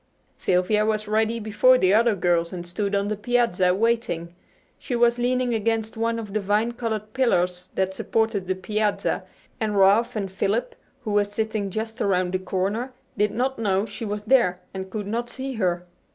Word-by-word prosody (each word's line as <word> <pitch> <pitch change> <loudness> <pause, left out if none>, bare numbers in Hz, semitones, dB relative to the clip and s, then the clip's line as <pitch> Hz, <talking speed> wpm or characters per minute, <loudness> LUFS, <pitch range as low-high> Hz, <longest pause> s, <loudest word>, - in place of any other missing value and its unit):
Sylvia 185 +4 +2
was 215 0 -1
ready 220 +2 +1
before 225 +4 +4
the 185 -5 +3
other 230 0 +4
girls 170 -2 +1
and 175 -1 -6
stood 200 +3 -2
on 200 0 +1
the 215 - -1
piazza 210 -5 +2
waiting. 210 -6 0 0.5
She 250 - -3
was 240 0 +3
leaning 250 0 +1
against 225 0 -1
one 230 +1 0
of 210 -3 -6
the 215 - +1
vine 210 +4 +1
covered 220 -3 -4
pillars 180 -8 +1
that 190 0 0
supported 220 -2 -1
the 185 - 0
piazza, 210 +2 -1 0.3
and 215 -3 -1
Ralph 200 +5 +4
and 195 -3 -3
Philip, 200 +5 -1 0.3
who 220 -5 -4
were 205 0 +4
sitting 205 0 -2
just 225 +4 -4
around 185 -2 +1
the 185 - +1
corner, 200 +7 -2 0.2
did 210 0 +2
not 255 +5 -1
know 200 -2 +1
she 230 - -8
was 210 -1 -3
there 210 -7 +3
and 190 0 -5
could 205 +1 -4
not 235 +4 -3
see 265 +2 -5
her. 180 -5 -1
215 Hz, 180 wpm, -24 LUFS, 190-230 Hz, 0.5 s, before